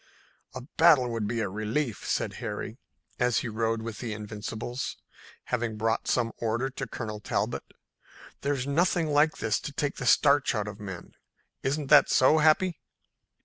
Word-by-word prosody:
"A 130 Hz, -, -5 dB, 0.2 s
battle 155 Hz, -7 st, +6 dB
would 115 Hz, -3 st, -2 dB
be 115 Hz, +1 st, -1 dB
a 105 Hz, -, 0 dB
relief," 110 Hz, +5 st, -2 dB
said -, -, 0 dB
Harry, -, -, -5 dB, 0.4 s
as 125 Hz, -2 st, +2 dB
he -, -, -1 dB
rode 115 Hz, 0 st, -1 dB
with 115 Hz, -2 st, -6 dB
the 115 Hz, -3 st, -4 dB
Invincibles, 110 Hz, +4 st, -5 dB, 0.5 s
having 120 Hz, -3 st, -2 dB
brought 110 Hz, +1 st, 0 dB
some 115 Hz, -2 st, +1 dB
order 115 Hz, +4 st, -1 dB
to 135 Hz, 0 st, -5 dB
Colonel 105 Hz, -2 st, -5 dB
Talbot. 105 Hz, -, -2 dB, 0.7 s
"There's 140 Hz, -3 st, -1 dB
nothing 165 Hz, +3 st, +1 dB
like 150 Hz, +2 st, +3 dB
this 115 Hz, -, 0 dB
to -, -, -6 dB
take 145 Hz, 0 st, -2 dB
the 125 Hz, -, -3 dB
starch 140 Hz, -1 st, +4 dB
out 105 Hz, -1 st, -1 dB
of 105 Hz, 0 st, -7 dB
men. 95 Hz, -4 st, -8 dB, 0.5 s
Isn't 140 Hz, +1 st, -2 dB
that 150 Hz, -, +8 dB
so, 150 Hz, +5 st, +5 dB
Happy?" 160 Hz, +2 st, +3 dB
120 Hz, 160 wpm, -28 LUFS, 110-145 Hz, 0.7 s, that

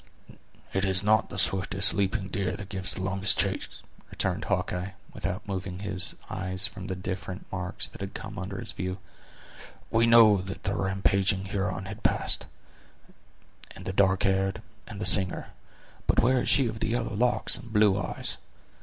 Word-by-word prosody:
"It 95 Hz, -, +1 dB
is 95 Hz, -1 st, +1 dB
not 110 Hz, +2 st, +3 dB
the -, -, -7 dB
swiftest 95 Hz, +1 st, +1 dB
leaping 95 Hz, 0 st, -1 dB
deer 95 Hz, 0 st, -1 dB
that 100 Hz, 0 st, -8 dB
gives 95 Hz, -2 st, +2 dB
the 95 Hz, -, -4 dB
longest 95 Hz, +1 st, +1 dB
chase," -, -, -2 dB, 0.3 s
returned -, -, -2 dB
Hawkeye, 90 Hz, +2 st, -2 dB, 0.2 s
without 100 Hz, +2 st, -4 dB
moving 95 Hz, -2 st, -4 dB
his 95 Hz, -1 st, -2 dB
eyes 95 Hz, +1 st, 0 dB
from 95 Hz, -4 st, -7 dB
the 95 Hz, -, -2 dB
different 95 Hz, +1 st, -5 dB
marks 90 Hz, -1 st, 0 dB
that -, -, -12 dB
had 100 Hz, 0 st, -6 dB
come 105 Hz, -1 st, -6 dB
under 95 Hz, +1 st, -5 dB
his -, -, -1 dB
view; 95 Hz, 0 st, -4 dB, 0.9 s
"we 115 Hz, +1 st, +4 dB
know 110 Hz, -4 st, +7 dB
that 95 Hz, +1 st, -7 dB
the 95 Hz, -, -1 dB
rampaging 95 Hz, 0 st, +1 dB
Huron 95 Hz, -1 st, -2 dB
has 105 Hz, +3 st, -7 dB
passed, -, -, +1 dB, 1.3 s
and -, -, -11 dB
the 95 Hz, -, -3 dB
dark 95 Hz, -1 st, +3 dB
hair, 95 Hz, 0 st, +2 dB, 0.4 s
and 100 Hz, -, -8 dB
the 105 Hz, -, -2 dB
singer, 95 Hz, -3 st, +5 dB, 0.6 s
but -, -, +3 dB
where 125 Hz, +2 st, +3 dB
is -, -, -1 dB
she 135 Hz, -3 st, +4 dB
of 110 Hz, -1 st, -5 dB
the -, -, -1 dB
yellow 120 Hz, 0 st, -1 dB
locks 120 Hz, +4 st, +2 dB
and 115 Hz, -, -11 dB
blue 105 Hz, -2 st, +4 dB
eyes? 105 Hz, -, -3 dB
95 Hz, 170 wpm, -28 LUFS, 95-105 Hz, 1.3 s, know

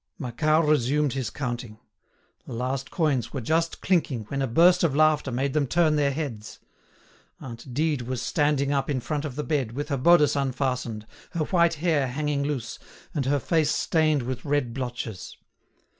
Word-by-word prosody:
Macquart 155 Hz, +4 st, +1 dB
resumed 145 Hz, 0 st, +2 dB
his 130 Hz, -5 st, -2 dB
counting. 120 Hz, -5 st, -5 dB, 0.7 s
The -, -, -7 dB
last 130 Hz, +3 st, -3 dB
coins 135 Hz, -, 0 dB
were 135 Hz, -, -2 dB
just 165 Hz, +7 st, -1 dB
clinking 155 Hz, -, +1 dB
when 140 Hz, -1 st, -2 dB
a 135 Hz, -, 0 dB
burst 175 Hz, +9 st, +5 dB
of 150 Hz, -5 st, +2 dB
laughter 155 Hz, -3 st, +3 dB
made 130 Hz, +2 st, -1 dB
them 150 Hz, -3 st, +1 dB
turn 155 Hz, +3 st, +3 dB
their 145 Hz, -2 st, +2 dB
heads. 135 Hz, -7 st, -5 dB, 0.8 s
Aunt 120 Hz, +1 st, -9 dB
Dide 150 Hz, +1 st, 0 dB
was 125 Hz, +1 st, -4 dB
standing 145 Hz, +1 st, +1 dB
up 140 Hz, 0 st, 0 dB
in 140 Hz, -3 st, 0 dB
front 150 Hz, +4 st, -3 dB
of 140 Hz, -4 st, -5 dB
the 150 Hz, -, -3 dB
bed, 135 Hz, -8 st, -1 dB
with 145 Hz, +4 st, -4 dB
her 140 Hz, -, 0 dB
bodice 150 Hz, +2 st, +5 dB
unfastened, 125 Hz, -5 st, -2 dB, 0.3 s
her 170 Hz, -3 st, 0 dB
white 170 Hz, -1 st, +2 dB
hair 155 Hz, -4 st, +1 dB
hanging 145 Hz, +2 st, -1 dB
loose, 140 Hz, -5 st, -3 dB, 0.3 s
and 140 Hz, -4 st, -1 dB
her 145 Hz, +1 st, +2 dB
face 155 Hz, +3 st, +1 dB
stained 155 Hz, -4 st, +1 dB
with 130 Hz, 0 st, -4 dB
red 145 Hz, -5 st, 0 dB
blotches. 120 Hz, -6 st, -5 dB
140 Hz, 175 wpm, -25 LUFS, 125-155 Hz, 0.8 s, burst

